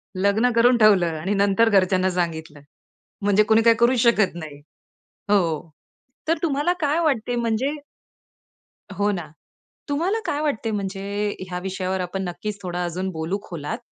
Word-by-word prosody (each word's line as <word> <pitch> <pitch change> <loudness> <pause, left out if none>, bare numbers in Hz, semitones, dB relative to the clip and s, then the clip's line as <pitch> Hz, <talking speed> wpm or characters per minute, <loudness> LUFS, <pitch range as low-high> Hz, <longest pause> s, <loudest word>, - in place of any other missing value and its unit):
लग्न 200 +6 +2
करून 240 +1 +5
ठेवलं 185 -7 +4
आणि 190 +6 -1
नंतर 200 +3 +3
घरच्यांना 185 -1 +3
सांगितलं, 160 -4 -3 0.6
म्हणजे 205 +1 +4
कुणी 220 +1 +4
काय 230 0 +6
करू 245 +2 +4
शकत 220 -6 +3
नाही. 155 -4 -9 0.7
हो. 165 -5 +1 0.6
तर 330 -1 +2
तुम्हाला 300 +2 +1
काय 295 +2 +1
वाटते 245 -6 0
म्हणजे 235 +6 -1 1.2
हो 205 +1 +1
ना. 170 -6 -5 0.6
तुम्हाला 350 +10 0
काय 295 -3 -1
वाटते 240 -7 -1
म्हणजे, 195 -1 -4 0.5
ह्या 180 0 -3
विषयावर 190 0 -3
आपण 190 +2 -4
नक्कीच 200 +4 -5
थोडा 180 -1 -3
अजून 185 +2 -3
बोलू 165 +4 -3
खोलात. 150 -4 -5
200 Hz, 140 wpm, -23 LUFS, 180-235 Hz, 1.2 s, काय